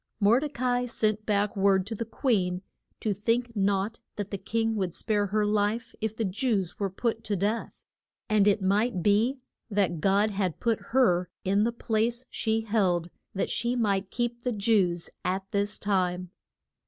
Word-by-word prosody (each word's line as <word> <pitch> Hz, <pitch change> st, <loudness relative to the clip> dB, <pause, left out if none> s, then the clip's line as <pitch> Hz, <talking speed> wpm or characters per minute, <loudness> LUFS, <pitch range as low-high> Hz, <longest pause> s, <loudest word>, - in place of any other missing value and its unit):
Mor 215 Hz, +4 st, +5 dB
de 295 Hz, +1 st, -3 dB
ca 250 Hz, -2 st, -1 dB
i 245 Hz, -, -1 dB
sent 215 Hz, -2 st, -1 dB
back 205 Hz, -1 st, +1 dB
word 195 Hz, -1 st, +3 dB
to 225 Hz, -, -4 dB
the 230 Hz, +1 st, -3 dB
queen 195 Hz, -7 st, 0 dB, 0.4 s
to 215 Hz, -, 0 dB
think 230 Hz, +4 st, -1 dB
not 200 Hz, +2 st, 0 dB, 0.2 s
that 205 Hz, -1 st, -5 dB
the 200 Hz, -, -2 dB
king 225 Hz, +3 st, -1 dB
would 185 Hz, -4 st, -2 dB
spare 205 Hz, -2 st, 0 dB
her 210 Hz, +2 st, +1 dB
life 210 Hz, +3 st, 0 dB
if 220 Hz, 0 st, -2 dB
the 225 Hz, -, 0 dB
Jews 195 Hz, -2 st, -1 dB
were 200 Hz, -1 st, 0 dB
put 225 Hz, +4 st, -2 dB
to 205 Hz, -, 0 dB
death. 210 Hz, +5 st, -2 dB, 0.4 s
And 210 Hz, -2 st, +3 dB
it 205 Hz, -1 st, +3 dB
might 200 Hz, 0 st, +1 dB
be 225 Hz, +6 st, +2 dB, 0.3 s
that 195 Hz, -6 st, 0 dB
God 200 Hz, +2 st, +3 dB
had 190 Hz, -4 st, -1 dB
put 230 Hz, -2 st, 0 dB
her 185 Hz, -9 st, +3 dB
in 200 Hz, +3 st, +2 dB
the 235 Hz, -, +1 dB
place 235 Hz, +1 st, 0 dB
she 225 Hz, 0 st, 0 dB
held 185 Hz, -6 st, +1 dB, 0.2 s
that 195 Hz, -, -1 dB
she 240 Hz, +2 st, 0 dB
might 200 Hz, -5 st, 0 dB
keep 240 Hz, +1 st, -2 dB
the 250 Hz, -, -1 dB
Jews 200 Hz, -5 st, +1 dB, 0.2 s
at 190 Hz, +1 st, -1 dB
this 205 Hz, +1 st, +1 dB
time. 180 Hz, -3 st, 0 dB
210 Hz, 180 wpm, -28 LUFS, 195-230 Hz, 0.4 s, Mor